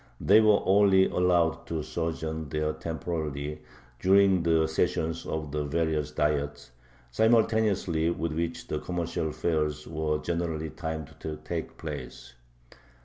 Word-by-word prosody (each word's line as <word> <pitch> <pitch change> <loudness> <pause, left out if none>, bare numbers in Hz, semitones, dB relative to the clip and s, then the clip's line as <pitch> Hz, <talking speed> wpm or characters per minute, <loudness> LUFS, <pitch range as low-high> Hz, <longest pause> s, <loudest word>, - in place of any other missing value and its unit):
They 105 +3 +6
were 105 -2 +5
only 95 -1 +5
allowed 90 -2 +1
to 80 -2 -3
sojourn 80 -2 -3
there 75 0 -1
temporarily 75 -3 -4 0.4
during 95 -1 +5
the 80 -1 +3
sessions 80 +1 -1
of 80 -2 -3
the 75 0 -1
various 75 0 0
Diets, 75 -4 -1 0.4
simultaneously 105 - +2
with 85 -1 -2
which 85 +1 -3
the 75 - -2
commercial 85 -2 -2
fairs 75 -2 -1
were 80 -1 -1
generally 80 -1 -3
timed 80 -2 -5
to 80 0 -5
take 85 -2 -5
place. 60 - -7
80 Hz, 125 wpm, -28 LUFS, 75-85 Hz, 0.4 s, They